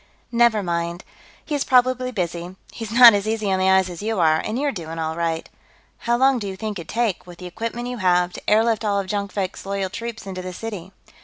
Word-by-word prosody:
"Never 235 -3 +3
mind. 170 0 -2 0.4
He's 290 -3 -1
probably 255 0 +2
busy, 175 -3 -4 0.2
he's 225 -2 -7
not 235 -1 +9
as 200 +1 0
easy 215 -2 -1
on 190 - +1
the 190 0 +3
eyes 190 -1 +4
as 175 -2 -8
you 220 -1 -1
are, 160 -2 +4
and 215 +7 -3
you're 285 +1 0
doing 165 -6 -7
all 160 0 -2
right.... 165 -1 -2 0.6
How 240 - +4
long 265 0 +3
do 205 - -4
you 190 - -5
think 210 -1 -5
it'd 165 - -9
take, 225 -6 -1
with 175 -1 -11
the 180 - -10
equipment 230 +6 -4
you 250 0 -4
have, 180 -2 +2
to - - -8
airlift 225 +1 +3
all 200 -2 +1
of 195 - -3
Jonkvank's 200 -1 -3
loyal 195 -1 -3
troops 230 0 -6
into 185 -1 -5
the 185 0 -6
city?" 195 -3 -7
200 Hz, 225 wpm, -22 LUFS, 180-230 Hz, 0.6 s, not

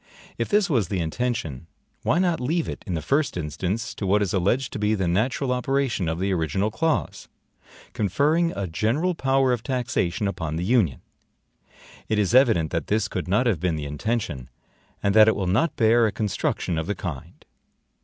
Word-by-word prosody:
If 115 - -1
this 205 -1 +3
was 120 - +1
the 95 0 -2
intention, 85 - -3 0.3
why - - +1
not 175 -3 +1
leave 160 +6 -1
it, - - -6
in 90 - -2
the 80 - -3
first 140 -6 0
instance, 95 +8 -3
to 100 - -4
what 105 +2 +3
is 95 - -2
alleged 100 +8 0
to - - -4
be 105 +1 +1
the 95 -3 -1
natural 125 +9 0
operation 125 -7 0
of 80 - -2
the 95 +2 0
original 95 +5 0
clause, 155 +8 -1 0.7
conferring 150 - +1
a 100 - -2
general 115 - 0
power 135 -3 +2
of 120 - -2
taxation 115 -5 -1
upon 80 -6 -3
the 85 +2 -2
Union? 100 - +2 1.1
It 110 - +1
is 105 0 +1
evident 115 - +4
that 85 - -2
this 110 +1 +1
could 90 -5 -4
not 105 +7 +2
have 110 -9 +1
been 90 -1 0
the 75 -1 -4
intention, 75 - -3 0.5
and 100 - +2
that 110 0 +7
it 110 - +4
will 95 - -2
not 110 - +1
bear 115 0 +4
a - - -1
construction 95 -5 -2
of 80 - -4
the 105 - -1
kind. 75 -8 -7
105 Hz, 190 wpm, -24 LUFS, 90-125 Hz, 1.1 s, that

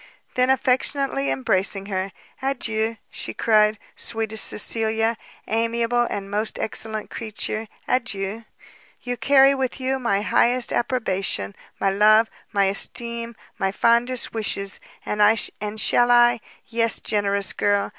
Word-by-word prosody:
Then 255 0 +2
affectionately 260 - +1
embracing 185 +9 0
her, 190 -1 -3 0.3
"Adieu," 230 -4 -1
she - - -5
cried, 215 -1 +3 0.2
"sweetest 220 -1 0
Cecilia, 225 +1 +1 0.3
amiable 230 +2 +1
and 195 -1 -4
most 210 +2 -1
excellent 220 -1 -4
creature, 220 0 -4 0.2
adieu! 220 -3 -2 0.6
you, 245 -1 -2
carry 275 +1 +5
with 265 -1 -2
you 265 +1 -1
my 205 -5 0
highest 240 +5 +2
approbation, 195 - -1 0.3
my 195 - +2
love, 215 +3 +5 0.2
my 200 -1 +2
esteem, 235 +4 -3 0.2
my 195 -1 +1
fondest 235 +4 +1
wishes! 200 -3 -2 0.3
and 210 - -1 0.6
shall 240 +2 +3
I 240 0 +5 0.3
yes, 230 -1 +1
generous 200 -2 0
girl! 205 0 +1
225 Hz, 115 wpm, -23 LUFS, 200-240 Hz, 0.6 s, carry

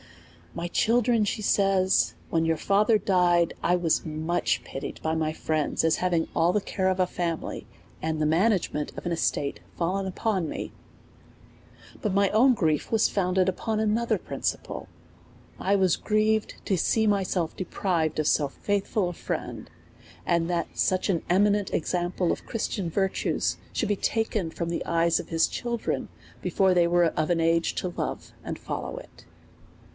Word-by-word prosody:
My 170 +1 -3
children, 230 +3 +2
says 195 -3 +2
she, - - -28
when 165 -1 +2
your 165 0 +1
father 210 +6 +3
died, 175 -4 +2
I 175 - +3
was 170 -3 +1
much 160 +2 -1
pitied 135 +1 -6
by 160 - 0
my 160 -1 0
friends, 155 -1 -1
as 160 -1 +3
having 175 -3 +1
all 165 +1 +3
the 210 - +2
care 190 -1 -1
of 185 0 -1
a 185 - +4
family, 170 -2 -4 0.3
and 160 0 -1
the 155 - +1
management 165 -2 +1
of - - -7
an 175 - -1
estate 145 -4 -1 0.2
fallen 190 +3 -1
upon 190 -3 -1
me. - - -5 1.3
But 205 -3 -1
my 200 -1 +4
own 250 +5 +5
grief 155 -7 0
was 225 -1 +4
founded 185 -1 +1
upon 215 +4 -1
another 220 +2 +1
prin - - -8
ciple: - - -3 0.7
I 200 +2 +2
was 190 -3 +3
grieved 215 0 +1
to 190 - +1
see 220 +6 +2
myself 190 -5 0
deprived 170 -4 -1
of 155 - +1
so 145 -2 +2
faith 200 +7 -2
ful 210 -6 0
a 175 - -4
friend, - - -5 0.6
and 170 0 +1
that 175 -1 -2
such 185 +2 +1
an 170 -4 +1
eminent 205 +2 +3
example 175 +1 0
of - - -5
Christian 205 -5 -2
virtues, 190 +3 0 0.2
should - - -1
be 205 - +2
taken 215 -4 -1
from 170 +1 -4
the 170 - -3
eyes 170 0 +2
of - - -8
his 165 -1 +3
children 235 -2 -3 0.3
before 190 -1 +2
they 175 -1 +4
we^e 175 -1 +3
of 155 - 0
an 175 -1 +2
age 165 0 +2
to 180 - -2
love - - -4
and - - -5
follow - - -5
it. - - -13
180 Hz, 170 wpm, -26 LUFS, 165-205 Hz, 1.3 s, own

